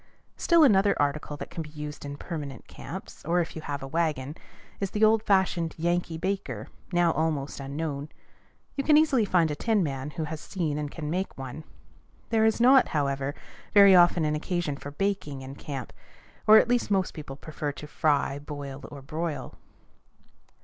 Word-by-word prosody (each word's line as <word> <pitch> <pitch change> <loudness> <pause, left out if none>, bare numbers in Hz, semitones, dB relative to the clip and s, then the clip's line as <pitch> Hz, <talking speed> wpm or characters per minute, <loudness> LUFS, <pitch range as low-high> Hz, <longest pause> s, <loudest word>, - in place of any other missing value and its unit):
Still 340 -2 +4
another 200 -6 +4
article 145 +1 -1
that - - -8
can 165 - -4
be 155 - -7
used 150 -1 -7
in 145 0 -6
permanent 145 -7 -6
camps, - - -9
or 170 +4 +1
if 170 - -2
you 160 - -5
have 145 -2 -4
a - - -5
wagon, 150 -2 -1 0.4
is 195 - -1
the 210 +3 -1
old 220 0 +5
fashioned 190 -5 +1
"Yankee 170 0 0
baker," 160 - -3 0.2
now 175 -1 +3
almost 155 -4 -1
unknown. 140 +1 -4 0.7
You 275 - -1
can 300 +1 +6
easily 280 -8 +4
find 170 -5 +2
a - - -2
tinman 150 - 0
who 160 - -3
has 155 0 -5
seen 155 -6 -2
and 150 -1 -3
can 150 0 -5
make 185 +3 -2
one. 135 +3 -7 0.7
There 220 -1 +4
is 220 +1 +2
not, 255 +2 +6
however, 140 -1 -1 0.4
very 200 -1 +9
often 175 -2 +5
an 150 - +1
occasion 165 -2 -2
for 145 - -8
baking 150 -5 -2
in 130 +1 -8
camp, 140 -3 -7 0.5
or 215 +1 +10
at - - +5
least 245 -2 +1
most 195 -2 +1
people 145 -4 -8
prefer 150 +1 -5
to 150 - -9
fry, 145 -2 +1
boil, 145 -2 -7
or 140 -2 -9
broil. 155 -2 -4
155 Hz, 175 wpm, -27 LUFS, 145-190 Hz, 0.7 s, or